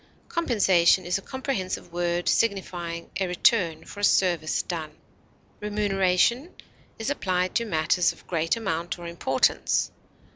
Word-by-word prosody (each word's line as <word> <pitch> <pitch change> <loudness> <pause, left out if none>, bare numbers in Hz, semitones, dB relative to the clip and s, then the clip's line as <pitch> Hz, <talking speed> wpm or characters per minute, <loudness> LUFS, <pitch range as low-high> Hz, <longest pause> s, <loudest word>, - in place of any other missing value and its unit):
Compensation 195 - +3
is 180 +2 0
a - - -12
comprehensive 230 -9 -4
word 175 0 -1
signifying 175 -6 -1
a 190 - 0
return 180 -2 +2
for 205 - -10
a - - -6
service 175 -6 +2
done. 165 -3 -4 0.7
Remuneration 210 - +1 0.4
is 225 +5 -2
applied 185 -8 -1
to 235 - +1
matters 170 -1 +2
of - - -17
great 165 +4 0
amount 175 -6 -3
or 175 - -9
importance. 170 -6 +1
180 Hz, 130 wpm, -26 LUFS, 170-210 Hz, 0.7 s, Compensation